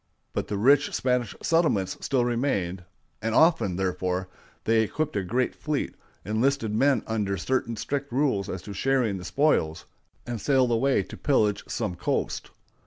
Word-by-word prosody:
But -, -, -2 dB
the 105 Hz, -, -2 dB
rich 140 Hz, +7 st, +4 dB
Spanish 125 Hz, -4 st, 0 dB
settlements 155 Hz, -, +2 dB
still 130 Hz, -3 st, +1 dB
remained; 100 Hz, -8 st, -1 dB, 0.4 s
and 115 Hz, +1 st, -1 dB
often, 160 Hz, -, +4 dB
therefore, 90 Hz, 0 st, -1 dB, 0.3 s
they 115 Hz, 0 st, +3 dB
equipped 150 Hz, +7 st, -2 dB
a 100 Hz, -, +1 dB
great 120 Hz, +7 st, 0 dB
fleet, 150 Hz, -2 st, -2 dB, 0.3 s
enlisted 110 Hz, +2 st, +1 dB
men 130 Hz, +1 st, +3 dB
under 105 Hz, -3 st, -1 dB
certain 115 Hz, +4 st, -1 dB
strict 140 Hz, +5 st, -3 dB
rules 120 Hz, -7 st, +1 dB
as 90 Hz, -2 st, -5 dB
to 100 Hz, -, -7 dB
sharing 125 Hz, -2 st, +1 dB
the -, -, -8 dB
spoils, 90 Hz, -, +1 dB, 0.4 s
and 120 Hz, -3 st, -4 dB
sailed 130 Hz, -3 st, +3 dB
away 130 Hz, +4 st, +2 dB
to -, -, -10 dB
pillage 105 Hz, -8 st, +2 dB
some -, -, -2 dB
coast. 90 Hz, 0 st, -2 dB
115 Hz, 155 wpm, -26 LUFS, 100-135 Hz, 0.4 s, rich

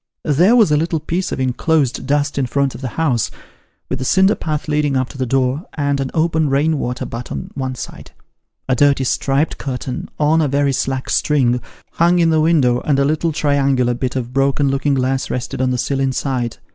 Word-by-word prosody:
There 175 Hz, -, +4 dB
was 220 Hz, -10 st, +5 dB
a 150 Hz, -, +4 dB
little 165 Hz, +1 st, 0 dB
piece 175 Hz, +4 st, -3 dB
of -, -, -3 dB
enclosed 130 Hz, +1 st, 0 dB
dust 145 Hz, +1 st, 0 dB
in 130 Hz, -, 0 dB
front 140 Hz, +1 st, 0 dB
of -, -, -10 dB
the 130 Hz, -, -3 dB
house, 135 Hz, -9 st, +1 dB, 0.6 s
with 130 Hz, 0 st, -4 dB
a -, -, -1 dB
cinder 190 Hz, +9 st, +4 dB
path 155 Hz, -7 st, -3 dB
leading 150 Hz, -2 st, +1 dB
up 130 Hz, -1 st, -1 dB
to 140 Hz, -, -11 dB
the 130 Hz, -, -1 dB
door, 135 Hz, +5 st, 0 dB
and 140 Hz, -2 st, 0 dB
an 135 Hz, -1 st, -2 dB
open 160 Hz, -2 st, +1 dB
rain 145 Hz, +3 st, +1 dB
water 125 Hz, -1 st, -3 dB
butt 115 Hz, +1 st, -7 dB
on 70 Hz, -, -5 dB
one 130 Hz, -2 st, -3 dB
side. -, -, -9 dB, 0.6 s
A 130 Hz, -, +2 dB
dirty 140 Hz, +1 st, +3 dB
striped 135 Hz, +4 st, 0 dB
curtain, 130 Hz, -2 st, -5 dB
on 155 Hz, +2 st, +3 dB
a 150 Hz, -, +2 dB
very 140 Hz, 0 st, +1 dB
slack 130 Hz, 0 st, -2 dB
string, 125 Hz, -5 st, +2 dB, 0.3 s
hung 170 Hz, +2 st, +3 dB
in 165 Hz, -2 st, +3 dB
the 160 Hz, -1 st, +3 dB
window, 145 Hz, -7 st, +3 dB
and 140 Hz, 0 st, 0 dB
a 140 Hz, -, +2 dB
little 155 Hz, +3 st, 0 dB
triangular 140 Hz, -4 st, +1 dB
bit 125 Hz, +1 st, -3 dB
of 125 Hz, -1 st, -4 dB
broken 135 Hz, +1 st, +2 dB
looking 135 Hz, +1 st, +1 dB
glass 130 Hz, 0 st, -1 dB
rested 125 Hz, 0 st, -3 dB
on 130 Hz, -, +1 dB
the 125 Hz, -, 0 dB
sill 135 Hz, +2 st, -1 dB
inside. 130 Hz, -3 st, -1 dB
140 Hz, 210 wpm, -18 LUFS, 130-155 Hz, 0.6 s, was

